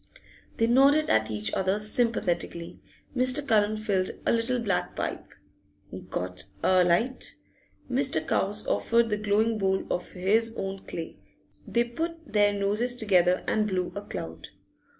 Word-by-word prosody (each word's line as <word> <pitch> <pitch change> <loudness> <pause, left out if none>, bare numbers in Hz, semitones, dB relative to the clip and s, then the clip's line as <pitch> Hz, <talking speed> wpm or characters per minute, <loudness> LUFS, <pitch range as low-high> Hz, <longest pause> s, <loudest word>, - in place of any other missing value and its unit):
They 225 - +3
nodded 275 +6 +4
at 110 0 +2
each 105 -1 -2
other 190 +2 +1
sympathetically. 210 -6 0 0.3
Mr. 255 +3 +3
Cullen 215 -2 +2
filled 200 -4 0 0.2
a - - +3
little 230 +2 +1
black 205 -6 -2
pipe. - - -4 0.8
'Got 90 +1 -3 0.2
alight?' 185 +7 +2 0.5
Mr. - - +1
Cowes - - 0
offered 235 - +1
the 210 - +1
glowing 215 +2 +1
bowl 190 -1 0
of 180 - -3
his 220 +5 +1
own 195 0 -5
clay; 165 -10 -7 0.5
they 235 - +2
put 320 +3 -6
their 205 -1 +4
noses 205 +5 0
together 185 -6 +2
and 215 -1 +1
blew 185 -3 -2
a 200 - -5
cloud. 80 - -7
210 Hz, 135 wpm, -27 LUFS, 185-235 Hz, 0.8 s, nodded